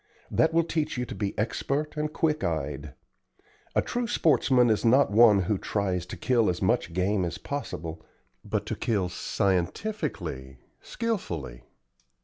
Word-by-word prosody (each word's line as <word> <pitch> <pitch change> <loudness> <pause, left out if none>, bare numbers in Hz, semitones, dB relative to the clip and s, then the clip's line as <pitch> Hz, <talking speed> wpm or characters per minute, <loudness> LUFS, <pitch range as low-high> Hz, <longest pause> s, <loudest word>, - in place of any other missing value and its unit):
That 160 - +3
will 165 +1 +3
teach 160 -4 -2
you 125 - -1
to - - -7
be 100 -2 -3
expert 140 +8 -1
and 150 0 -2
quick 155 -1 0
eyed. 75 -3 -3 0.8
A - - +3
true 245 -1 -2
sportsman 130 - +3
is 110 - +1
not 125 +1 +4
one 105 -3 +6
who 95 +1 0
tries 95 -4 -1
to - - -7
kill 120 -4 +2
as 90 - -1
much - - +1
game 95 +3 +1
as 85 - -3
possible, 85 - -5 0.4
but - - -2
to - - -3
kill 100 -6 0
scientifically, 90 - -2 0.2
skilfully. 85 - -4
105 Hz, 145 wpm, -27 LUFS, -, 0.8 s, one